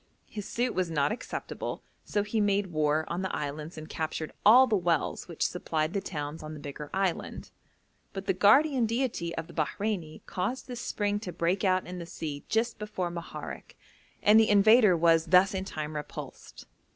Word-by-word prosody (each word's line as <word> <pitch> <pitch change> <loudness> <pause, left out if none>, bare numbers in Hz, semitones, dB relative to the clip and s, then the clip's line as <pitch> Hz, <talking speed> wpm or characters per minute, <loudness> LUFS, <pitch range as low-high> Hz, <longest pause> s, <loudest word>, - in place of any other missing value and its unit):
His 210 -2 -7
suit 245 +1 -1
was 185 -2 0
not 145 -3 +1
acceptable, 235 - -5 0.2
so 205 - -1
he 210 +1 -1
made 200 -2 +1
war 155 0 +1
on 175 +2 -3
the 190 - -2
islands 150 +3 -5
and 155 0 -7
captured 155 0 -4
all 245 +5 +8
the 230 -4 +1
wells 175 -4 0
which 170 -3 -2
supplied 160 -2 -1
the 200 - 0
towns 150 -3 -5
on 155 0 -7
the - - -9
bigger 145 0 -7
island; 190 -3 -2 0.6
but 195 0 -6
the - - +2
guardian 245 +6 +4
deity 230 -8 -2
of 165 - -4
the 170 - -14
Bahreini 170 0 -2
caused 200 +9 -3
this 245 -2 -6
spring 205 0 -1
to 195 -4 -6
break 175 +3 0
out 185 -1 +2
in 180 0 -7
the 170 - -7
sea 150 -4 -6
just 225 +1 0
before 210 -5 -3
Moharek, 170 -1 -8 0.5
and 210 +2 +7
the 220 - +4
invader 210 -1 +6
was 165 0 +4
thus 185 +4 +5
in 190 0 -3
time 155 -4 -5
repulsed. 150 - -8
180 Hz, 185 wpm, -29 LUFS, 160-210 Hz, 0.6 s, all